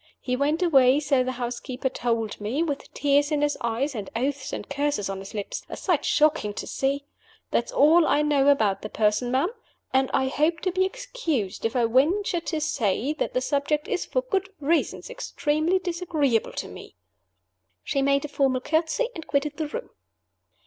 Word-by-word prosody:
He 250 - -2
went 295 +6 +1
away, 270 -5 +5
so 280 -3 +2
the 255 0 -2
housekeeper 250 +1 -3
told 230 -5 -2
me, 245 +10 0
with 290 -4 -4
tears 285 +1 +2
in 295 -1 +1
his 295 0 +1
eyes, 235 +5 -1
and 210 -5 -5
oaths 265 +3 -2
and - - -5
curses 285 -9 -1
on 195 - -5
his 195 +2 -9
lips 205 -1 -4
a - - -6
sight 340 -7 0
shocking 300 -9 +2
to - - -4
see. 275 +1 -1 0.5
That's - - 0
all 335 -8 +5
I 295 - +3
know 285 -2 +3
about 220 -9 +3
the 215 - -6
Person, 215 +3 +1
ma'am, 265 +8 +2 0.4
and 265 0 +3
I 265 - +2
hope 305 +5 +1
to 370 - 0
be 375 +1 +2
excused 330 - -3
if 225 - -1
I 240 -2 +3
venture 335 - +2
to 325 -1 -2
say 250 -2 0
that 310 - -3
the 255 - +2
subject 290 +3 0
is 390 -5 -1
(for - - 0
good 390 -6 -1
reasons) 315 +3 0
extremely 330 -7 0
disagreeable 335 - 0
to - - -4
me." - - -11 0.9
She 275 - 0
made 280 +1 +2
a - - -3
formal 270 -3 +1
courtesy, 320 - 0
and 325 -5 -8
quitted 295 +1 -1
the 315 -1 -2
room. 485 +12 -6
285 Hz, 185 wpm, -25 LUFS, 255-320 Hz, 0.9 s, away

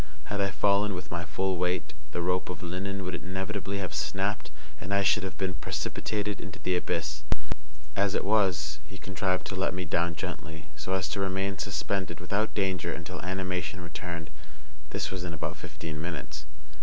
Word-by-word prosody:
Had 100 - +2
I 100 - +4
fallen 100 +1 +4
with 90 - -5
my 85 0 0
full 95 +4 +1
weight, 90 -3 +1 0.2
the 85 - 0
rope 90 +1 +2
of 90 - -4
linen 95 +3 -1
would 90 - -1
inevitably 95 +3 -1
have 95 -4 -2
snapped, 95 +8 +1 0.3
and 100 - -4
I 100 - +5
should 105 +2 +6
have 95 -1 -3
been 95 -2 +1
precipitated 105 +4 -1
into 95 - -6
the 90 - +2
abyss; 75 -3 0 0.7
as 100 -1 +4
it - - +2
was, 95 -8 +4
he 95 - -8
contrived 95 -1 +1
to 95 - -2
let 95 -1 +2
me 90 -1 -1
down 85 +1 +2
gently, 80 0 -4
so 95 - -1
as 95 -4 +2
to 100 - -1
remain 95 0 +1
suspended 95 -2 0
without 100 +5 +1
danger 95 -4 +2
until 85 +3 -4
animation 90 -2 0
returned. 85 -2 -4 0.6
This - - -1
was 95 -1 -2
in 85 -2 -2
about 75 - -1
fifteen 80 -2 -5
minutes. 80 -3 -3
90 Hz, 180 wpm, -31 LUFS, 85-95 Hz, 0.7 s, should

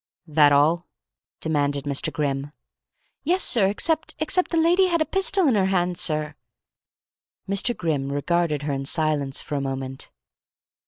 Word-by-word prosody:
"That 150 -2 +4
all?" 155 +5 +2 0.5
demanded 145 -3 -1
Mr. 145 +3 -1
Grimm. 140 -1 -3 0.7
"Yes, 360 +5 +2
sir, 215 -6 +4
except 315 - -1
except 350 +4 0
the 335 - -1
lady 350 +4 +3
had 340 -2 0
a 315 - +1
pistol 385 -1 +2
in 265 - +3
her 195 -3 +2
hand, 180 -2 0
sir 155 -3 +1 0.6
" - - -61
Mr. 200 +5 +1
Grimm 145 -5 -2
regarded 150 0 -1
her 145 -1 -2
in 135 0 -4
silence 145 -3 -1
for - - -8
a 140 - -1
moment. 135 -1 -5
160 Hz, 155 wpm, -23 LUFS, 145-240 Hz, 0.7 s, That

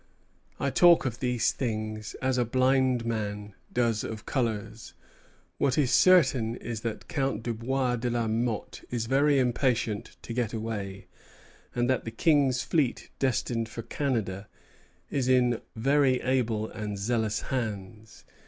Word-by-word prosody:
I 140 - 0
talk 170 +2 +6
of 120 -1 -3
these 125 -3 +1
things 110 -3 -4
as 130 -1 +1
a - - +4
blind 130 0 +2
man 105 -2 -3 0.2
does 115 -3 +1
of 110 -1 -6
colors. 115 -6 -3 0.6
What 130 - +2
is 140 -5 +2
certain 130 -11 +4
is 115 -3 -5
that 115 -2 -5
Count 135 -5 -1
Dubois 125 +2 -1
de 120 +1 -2
la 120 -1 0
Motte 115 0 -2
is 120 -2 -2
very 140 +4 +3
impatient 120 -4 0
to 115 - -6
get 120 -2 -1
away, 105 -4 -4 0.7
and 120 0 +1
that 130 -1 +1
the - - -4
King's 135 +1 +2
fleet 145 -7 0
destined 120 -3 0
for 115 +1 -6
Canada 105 -9 -2 0.6
is 135 -3 0
in 125 -2 +3
very 135 +2 +3
able 115 -4 0
and 105 -2 -5
zealous 110 +1 0
hands. 110 -3 -5
120 Hz, 140 wpm, -28 LUFS, 110-130 Hz, 0.7 s, talk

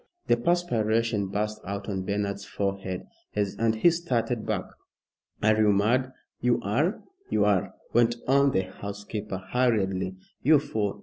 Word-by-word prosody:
the - - +4
perspiration 115 - +1
burst 105 +2 -2
out 100 +1 -5
on 95 -3 -2
Bernard's 100 0 -2
forehead, 95 -2 -3 0.3
and 110 +2 +1
he 140 +10 +5
started 125 -9 -1
back. - - 0 0.8
"Are 110 +1 +5
you 105 -1 +4
mad?" 120 +6 +2 0.3
"You 120 0 +2
are, 140 - 0 0.3
you 105 - +2
are," 100 -3 +1 0.2
went 120 0 +4
on 140 +1 +5
the 95 -8 +2
housekeeper, 100 +1 -6
hurriedly, 95 -3 0 0.3
"you 155 +3 +6
fool! 105 -7 -2
105 Hz, 135 wpm, -27 LUFS, 100-120 Hz, 0.8 s, you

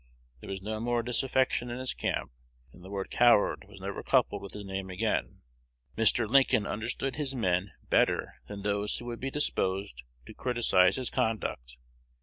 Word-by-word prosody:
There - - -10
was 95 -1 -5
no 110 +1 -3
more 120 +1 0
disaffection 125 0 +1
in 120 - -4
his 130 0 -2
camp, 65 - -2 0.4
and 90 - -15
the 95 - -10
word 100 -1 -4
"coward" 120 -4 +4
was 100 -1 -13
never 100 +1 -5
coupled 120 -6 +2
with 100 -1 -8
his 105 -1 -7
name 95 0 -4
again. 90 - -1 0.5
Mr. 115 +1 +3
Lincoln 130 -3 +4
understood 120 +6 -2
his 140 -3 -2
men 90 -5 0
better - - +2
than 100 +4 -7
those 105 0 0
who 120 - -7
would 120 -1 -5
be 135 - -2
disposed 95 - -1 0.2
to - - -10
criticise 115 -7 +3
his 130 -2 -2
conduct. 60 - -2
110 Hz, 170 wpm, -30 LUFS, 95-120 Hz, 0.5 s, coward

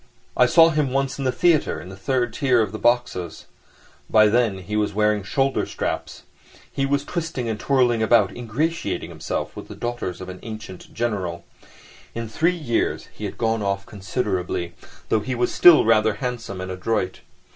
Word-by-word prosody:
I 125 - +5
saw 165 +5 +6
him 150 -4 0
once 135 +1 -1
in 135 - -2
the 130 - +2
theatre, 160 - +2
in 85 +3 -10
the 95 - -9
third 120 +4 -1
tier 130 -3 +2
of 110 -1 -1
boxes. 120 -8 0 0.6
By 110 -1 +6
then 115 -3 +2
he 105 +3 -4
was 105 -2 0
wearing 105 0 +2
shoulder 135 +7 0
straps. - - -4 0.5
He 135 0 0
was 140 +1 0
twisting 165 -8 -3
and 110 -1 -3
twirling 125 -4 +2
about, 115 +1 +3
ingratiating 135 +8 -2
himself - - -4
with - - -8
the - - -9
daughters 120 -7 -4
of 95 - -7
an 95 0 -8
ancient 110 -5 -9
General. 95 -8 -3 0.7
In 115 0 -4
three 165 +10 +1
years 120 -8 -1
he - - -7
had - - -6
gone 115 -1 0
off 100 -1 -2
considerably, 95 -4 -3 0.4
though 110 - +3
he 125 +5 -3
was 120 0 0
still 175 -8 +7
rather 110 -1 +3
handsome 115 -4 -4
and 95 0 -5
adroit. 95 0 -2
115 Hz, 175 wpm, -23 LUFS, 100-130 Hz, 0.7 s, still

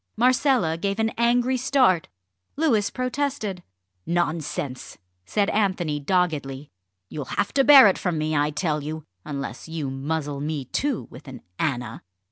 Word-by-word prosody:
Marcella 245 - +2
gave 200 +2 -1
an 225 0 +1
angry 245 +2 +2
start. 255 -9 +2 0.5
Louis 235 -10 +2
protested. 255 -7 -2 0.5
"Nonsense!" 155 -6 -2 0.3
said 205 -2 +1
Anthony 185 -8 0
doggedly; 145 -4 -1 0.4
"you'll 145 +7 -6
have 200 - -2
to 275 - +4
bear 275 -3 +9
it 195 - +3
from 175 -4 -1
me, 155 0 -1
I 145 0 +2
tell 150 -1 -1
you 155 +1 -6 0.2
unless 140 +2 -6
you 155 -4 -3
muzzle 145 +1 -3
me 150 -2 -3
too 270 - -2
with - - -13
an - - -10 0.2
Anna." 120 -6 -2
175 Hz, 140 wpm, -24 LUFS, 150-235 Hz, 0.5 s, bear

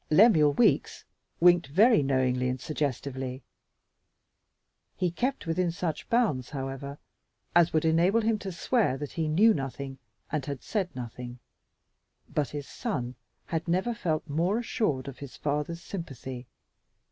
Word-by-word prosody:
Lemuel 155 -5 +6
Weeks 240 - +2 0.4
winked 175 -2 +5
very 205 - +5
knowingly 130 -2 +1
and 130 +1 -2
suggestively. 130 -2 -3 1.5
He 180 -2 +1
kept 250 +5 -2
within 170 +1 0
such 165 -2 -4
bounds, 205 - +1
however, 135 0 -5 0.6
as 175 -1 +6
would 155 0 +1
enable 175 +7 +4
him 220 -1 +1
to 195 - -5
swear 180 - +1
that 145 0 -5
he 160 -2 -1
knew 205 +9 +5
nothing 135 -2 -5 0.3
and 155 -3 -1
had 140 -1 -5
said 195 -5 -1
nothing, 125 0 -7 0.9
but 150 -2 -1
his 145 -2 -6
son 125 - -3 0.3
had 165 0 -3
never 185 +8 +1
felt 165 -7 -2
more 170 +8 +1
assured 210 - -1
of 135 -1 -8
his 140 -4 -9
father's 150 +3 -2
sympathy. 135 - -7
155 Hz, 135 wpm, -28 LUFS, 135-180 Hz, 1.5 s, Lemuel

